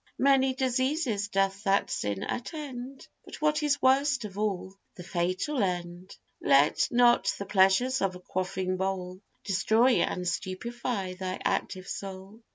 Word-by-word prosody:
Many 270 Hz, -1 st, +3 dB
diseases 260 Hz, -4 st, 0 dB
doth 195 Hz, 0 st, 0 dB
that 195 Hz, -2 st, +2 dB
sin 100 Hz, -1 st, -2 dB
attend, 265 Hz, -1 st, -6 dB, 0.2 s
But -, -, -10 dB
what 305 Hz, 0 st, +1 dB
is 290 Hz, -1 st, +1 dB
worst 265 Hz, -2 st, +3 dB
of 195 Hz, -2 st, -8 dB
all, 200 Hz, -3 st, -2 dB, 0.2 s
the 180 Hz, -, -9 dB
fatal 185 Hz, -, -1 dB
end: 175 Hz, -1 st, -3 dB, 0.2 s
Let 140 Hz, +2 st, +4 dB
not 240 Hz, 0 st, +4 dB
the 200 Hz, -, -5 dB
pleasures 200 Hz, +7 st, +3 dB
of 190 Hz, -2 st, 0 dB
a -, -, -9 dB
quaffing 185 Hz, 0 st, -3 dB
bowl 185 Hz, -1 st, -3 dB, 0.2 s
Destroy 220 Hz, +6 st, +3 dB
and 180 Hz, -, -1 dB
stupify 190 Hz, +2 st, -3 dB
thy 185 Hz, 0 st, -3 dB
active 185 Hz, 0 st, -1 dB
soul. 195 Hz, +3 st, -7 dB
200 Hz, 140 wpm, -28 LUFS, 185-255 Hz, 0.2 s, Let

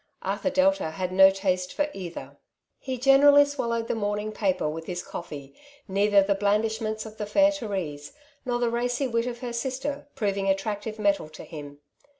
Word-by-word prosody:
Arthur 280 Hz, -, -1 dB
Delta 280 Hz, -, +2 dB
had 180 Hz, +3 st, -4 dB
no 190 Hz, +1 st, +8 dB
taste 185 Hz, -2 st, -1 dB
for 295 Hz, -, 0 dB
either. 180 Hz, -3 st, -8 dB, 0.4 s
He 260 Hz, -1 st, -4 dB
generally 280 Hz, +3 st, +6 dB
swallowed 235 Hz, -5 st, -2 dB
the 240 Hz, -, 0 dB
morning 210 Hz, -1 st, -2 dB
paper 190 Hz, -6 st, 0 dB
with 160 Hz, +2 st, -5 dB
his 175 Hz, -1 st, -4 dB
coflfee, 145 Hz, -5 st, -8 dB, 0.3 s
neither 200 Hz, 0 st, +4 dB
the 200 Hz, +1 st, +2 dB
blandishments 215 Hz, +2 st, 0 dB
of 220 Hz, 0 st, -10 dB
the 210 Hz, -, -2 dB
fairTherese, 205 Hz, -, 0 dB, 0.3 s
nor 245 Hz, -2 st, -1 dB
the 240 Hz, -1 st, 0 dB
racy 245 Hz, +3 st, -1 dB
wit 230 Hz, -1 st, 0 dB
of 240 Hz, 0 st, -5 dB
her 245 Hz, -2 st, -4 dB
sister, 265 Hz, +4 st, -3 dB
proving 200 Hz, -5 st, -1 dB
attractive 205 Hz, +2 st, -2 dB
metal 200 Hz, -6 st, +1 dB
to 155 Hz, -, -11 dB
him. 145 Hz, -2 st, -10 dB
210 Hz, 165 wpm, -26 LUFS, 190-245 Hz, 0.4 s, no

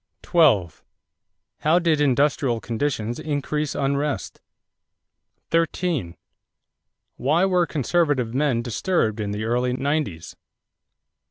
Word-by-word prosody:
12. 130 Hz, -, +2 dB, 0.8 s
How 155 Hz, +3 st, +3 dB
did 165 Hz, -4 st, +2 dB
industrial 140 Hz, -3 st, +2 dB
conditions 120 Hz, -1 st, -2 dB
increase 150 Hz, 0 st, -2 dB
unrest? 140 Hz, +1 st, -2 dB, 1.1 s
13. 165 Hz, -, 0 dB, 1.0 s
Why 155 Hz, +8 st, +2 dB
were 180 Hz, -3 st, +2 dB
conservative 145 Hz, -5 st, 0 dB
men 130 Hz, -4 st, +1 dB
disturbed 120 Hz, -, 0 dB
in 105 Hz, -1 st, -2 dB
the 105 Hz, +1 st, -3 dB
early 125 Hz, +2 st, 0 dB
nineties? 130 Hz, -, -2 dB
140 Hz, 90 wpm, -23 LUFS, 115-155 Hz, 1.1 s, How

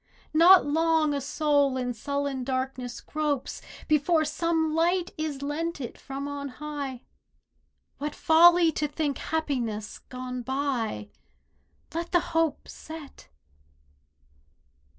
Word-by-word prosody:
Not 350 Hz, +4 st, +8 dB
long 320 Hz, 0 st, +2 dB
a 280 Hz, -, -1 dB
soul 285 Hz, -1 st, +2 dB
in 250 Hz, -1 st, -2 dB
sullen 280 Hz, +2 st, -2 dB
darkness 255 Hz, -1 st, -3 dB
gropes 300 Hz, -3 st, -2 dB, 0.3 s
Before 310 Hz, +1 st, +3 dB
some 325 Hz, -1 st, 0 dB
light 345 Hz, +2 st, +1 dB
is 300 Hz, -3 st, -4 dB
lent 320 Hz, +3 st, -2 dB
it 245 Hz, -4 st, -6 dB
from 275 Hz, +1 st, -6 dB
on 285 Hz, 0 st, -4 dB
high; 280 Hz, -2 st, -6 dB, 1.0 s
What 295 Hz, +1 st, -3 dB
folly 340 Hz, +1 st, +6 dB
to 300 Hz, 0 st, -1 dB
think 295 Hz, -1 st, -2 dB
happiness 245 Hz, -9 st, -2 dB
gone 255 Hz, 0 st, -6 dB
by! 255 Hz, -5 st, -2 dB, 0.8 s
Let 335 Hz, +3 st, -4 dB
the 350 Hz, -, +6 dB
hope 325 Hz, -3 st, +1 dB
set! 315 Hz, -3 st, -10 dB
290 Hz, 110 wpm, -27 LUFS, 265-320 Hz, 1.0 s, Not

